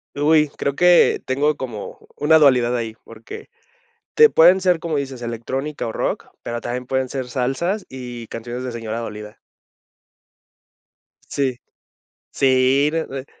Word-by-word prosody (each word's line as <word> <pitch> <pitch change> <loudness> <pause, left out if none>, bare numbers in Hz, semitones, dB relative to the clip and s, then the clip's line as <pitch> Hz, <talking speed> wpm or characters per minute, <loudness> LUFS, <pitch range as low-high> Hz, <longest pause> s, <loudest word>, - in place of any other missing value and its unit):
Uy, 150 +1 +3
creo 140 - -1
que 180 +1 +5
tengo 145 +3 +1
como 120 -7 -7
una 160 +2 +5
dualidad 125 -5 +4
ahí, 115 -2 -3
porque, 115 - -11 0.7
te 455 -1 +7
pueden 180 +4 +6
ser, 180 -2 +2
como 160 -1 -3
dices, 135 -3 -4
electrónica 130 +5 -4
o 110 - -4
rock, - - -2 0.2
pero 120 0 -4
también 125 +1 -4
pueden 130 0 -1
ser 130 -1 -5
salsas 135 - -1
y 120 -3 -8
canciones 120 +2 -6
de 130 - -4
señora 115 -1 -5
dolida. 105 -2 -8 1.9
Sí. 130 -3 -2 0.7
Sí, 135 +2 +3
re 165 0 -1
re 135 0 -6
130 Hz, 140 wpm, -21 LUFS, 120-150 Hz, 1.9 s, te